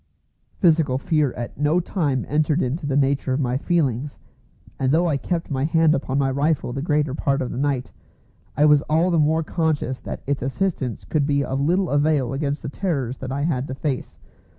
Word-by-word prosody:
Physical 160 -7 +3
fear 150 0 +1
at 120 +2 -7
no 150 +4 +3
time 150 -7 -1
entered 155 +2 +1
into 145 +4 -2
the 140 -1 +1
nature 140 -1 +1
of 130 - 0
my 125 -3 0
feelings; 140 -3 -1 0.6
and 130 -1 +1
though 165 +4 +3
I 155 - +1
kept 165 +4 -3
my 135 -1 -1
hand 160 0 +3
upon 135 -2 -1
my 135 -1 +2
rifle 140 -2 0
the 135 - -3
greater 150 -3 0
part 140 -1 0
of 130 - -3
the - - -5
night, 140 -3 -1 0.7
I 150 - +5
was 150 -1 +6
all 165 +4 +3
the 170 - +3
time 160 +2 +2
conscious 155 -5 -1
that - - -7
its 140 0 -1
assistance 135 - -2
could 145 -3 0
be 140 -1 +2
of 135 +1 -2
little 175 +4 +1
avail 145 -3 +2
against 145 +1 -2
the - - -4
terrors 140 -8 -2
that 130 -1 -5
I 140 +2 -2
had 140 -4 -1
to 130 - -5
face. 135 -2 -3
145 Hz, 200 wpm, -22 LUFS, 135-155 Hz, 0.7 s, was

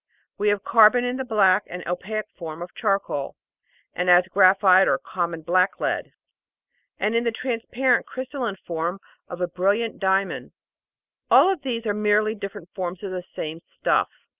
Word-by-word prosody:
We 210 +1 +2
have 205 -1 0
carbon 230 +2 +5
in 245 +1 -2
the 265 - -3
black 205 -5 +3
and 180 0 -8
opaque 210 +4 -3
form 165 -1 -7
of 175 - -11
charcoal, 195 - -2 0.6
and 180 +1 -1
as 180 +1 +6
graphite 190 0 +5
or - - +3
common 170 -3 -4
black 185 +3 +1
lead, - - -2 0.9
and 215 - -1
in 230 - +2
the 235 - 0
transparent 250 +2 -1
crystalline 255 -4 -4
form 170 +3 -3 0.3
of 175 - -8
a 180 - +1
brilliant 200 +6 -1
diamond. 190 0 -1 0.8
All 385 +1 +6
these 255 -7 -4
things - - -19
are 210 - 0
merely 210 +1 +2
different 200 -4 -8
forms 185 0 -5
of 195 - -5
the 185 -1 -4
same 160 +1 -5 0.2
"stuff." - - +2
195 Hz, 165 wpm, -23 LUFS, 180-225 Hz, 0.9 s, as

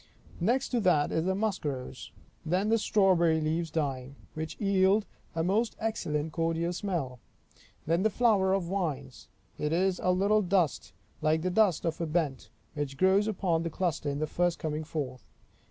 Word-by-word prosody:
Next 240 +9 +1
to 245 - +1
that 175 -8 +2
is 160 - 0
the 190 0 +1
musk 205 -1 -1
rose. 130 -3 -5 0.3
Then 185 +6 0
the 225 0 +3
strawberry 180 -7 +3
leaves 160 +2 -1
dying, 140 -4 -3 0.2
which 160 0 -6
yield 200 +1 +3 0.3
a 165 - 0
most 210 +6 +1
excellent 160 -9 -2
cordial 165 +1 0
smell. 170 - -3 0.7
Then 165 +3 +1
the 220 - +3
flower 210 -4 +3
of 195 -1 +1
vines; 150 - -4 0.3
it 150 - -1
is 185 +2 +1
a 180 - +1
little 200 +4 +3
dust, 180 - 0 0.3
like 155 +1 +1
the 185 - 0
dust 190 -4 +2
of 165 0 -2
a 165 - -1
bent, 150 -5 -1 0.2
which 145 -3 -4
grows 190 +5 +3
upon 180 -6 0
the 165 - -2
cluster 165 -3 -2
in 140 - -2
the 155 - 0
first 175 +2 0
coming 155 0 -3
forth. 130 -6 -5
170 Hz, 170 wpm, -29 LUFS, 155-195 Hz, 0.7 s, the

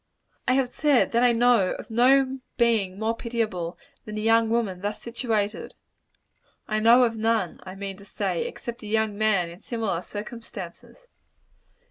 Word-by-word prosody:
I 255 - +4
have 260 -1 +2
said 285 0 +2
that 235 - +2
I 245 -1 +5
know 235 -5 +3
of - - -9
no 265 +3 +4 0.2
being 220 -6 +2
so 220 +1 0
pitiable, 215 -8 -3 0.3
as 215 - -6
a - - -2
young 225 +1 +3
woman 220 -6 -1
thus 205 +1 -3
situated. 225 -3 -2 0.9
I 215 0 0
know 235 +3 +6
of 230 -2 +1
none, 220 -4 0
I 185 0 -8
mean 195 -1 -6
to 200 - -14
say, 195 -3 -2
except 235 0 -7
a 215 - -8
young 220 -1 0
man 200 -5 +1
in 175 - -12
similar 220 -7 -2
circumstances. 210 - -9
220 Hz, 160 wpm, -25 LUFS, 200-235 Hz, 0.9 s, know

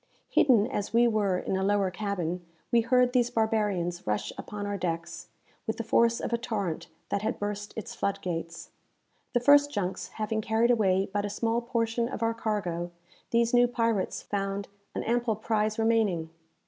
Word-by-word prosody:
Hidden 235 -7 +5
as 205 0 -3
we 240 +1 +6
were 205 -5 +1
in 190 - -2
a 190 - 0
lower 200 -1 +2
cabin, 180 -3 -3 0.3
we 235 - +5
heard 250 +1 +3
these 245 -2 +3
barbarians 205 - 0
rush 105 0 -1
upon 205 -1 -6
our 205 0 -2
decks, 170 -2 -4 0.4
with 220 - -1
the 230 - -2
force 235 +1 +3
of - - -3
a 235 - +1
torrent 205 -10 -3 0.2
that 200 - 0
had 215 - -1
burst 205 0 -4
its 235 +2 -5
flood 200 -4 -1
gates. 165 -1 -5 0.6
The 245 - +3
first 285 +3 +6
junks 190 -6 -2
having 220 0 -1
carried 225 +3 +2
away 195 -4 +3
but 205 0 0
a 205 - -2
small 230 +3 0
portion 235 -1 0
of 230 - -4
our 230 0 +2
cargo, 195 -7 -2 0.4
these 235 0 +2
new 245 0 +6
pirates 230 -4 0
found 195 0 -2 0.3
an - - -2
ample 235 -1 +1
prize 215 0 0
remaining. 215 -8 +1
215 Hz, 175 wpm, -28 LUFS, 195-230 Hz, 0.6 s, we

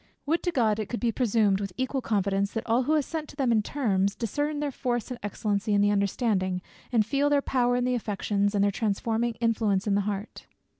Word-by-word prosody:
Would 325 +4 +1
to 350 - -1
God 220 -8 +2
it 210 -2 -3
could 240 - -3
be 235 -2 +1
presumed, 215 -4 +2
with 195 -2 -4
equal 260 +1 -1
confidence, 200 -2 0
that 225 0 -3
all 240 +3 +2
who 310 - +2
assent 305 +1 -2
to - - -12
them 270 -4 +1
in 220 -2 +4
terms, 200 -6 0
discern 290 +6 -2
their 290 -1 -1
force 245 -2 -2
and 245 - -5
excellency 205 +1 -1
in 200 - +4
the 205 0 +4
understanding, 200 -2 0 0.3
and 225 -4 +3
feel 280 +5 +1
their 290 -1 +4
power 245 -2 +1
in 245 - +1
the 250 0 +1
affections, 205 -2 -1
and 200 - +3
their 200 - +3
transforming 225 +3 -1
influence 220 -4 +1
in 205 - +1
the 200 - +3
heart. 200 +1 -6
225 Hz, 220 wpm, -27 LUFS, 200-250 Hz, 0.3 s, in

